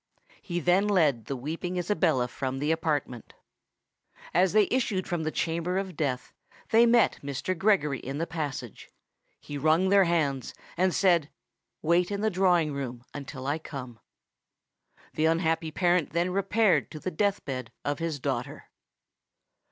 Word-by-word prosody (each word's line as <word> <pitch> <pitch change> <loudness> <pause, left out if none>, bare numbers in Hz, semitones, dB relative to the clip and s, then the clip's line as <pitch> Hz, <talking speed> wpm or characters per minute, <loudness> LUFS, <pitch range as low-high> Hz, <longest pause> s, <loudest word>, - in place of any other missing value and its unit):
He 175 -3 -3
then 180 +5 +3
led 150 - +2
the 135 - -3
weeping 165 +7 -4
Isabella 175 -8 +1
from 130 +1 -4
the 145 +3 0
apartment. 150 -7 -2 1.0
As 180 +2 +4
they 210 -1 +4
issued 225 -7 0
from 175 -2 -2
the 155 - -1
chamber 170 +3 -1
of 190 -3 -3
death, 135 -4 -2 0.4
they 230 +1 +6
met 235 -2 +4
Mr. 140 +6 -3
Gregory 170 - +2
in 135 +2 -5
the 165 - -1
passage: 145 - -5 0.5
he 145 -1 -7
wrung 160 +6 +3
their 200 -1 +5
hands, 145 -6 0 0.2
and 185 +2 +2
said, 175 -6 +3 0.5
"Wait 170 +2 +3
in 200 0 -3
the 220 0 +1
drawing 175 -5 +2
room 125 -3 -5
until 135 -2 -7
I 145 +3 -1
come." 130 -7 -8 1.1
The 155 - +1
unhappy 165 0 +1
parent 175 -1 +1
then 170 +2 +1
repaired 200 +2 +2
to 155 - -8
the 185 - -4
death 200 +4 0
bed 130 -4 -5
of 145 0 -1
his 165 -3 -2
daughter. - - -4
165 Hz, 150 wpm, -28 LUFS, 145-185 Hz, 1.1 s, they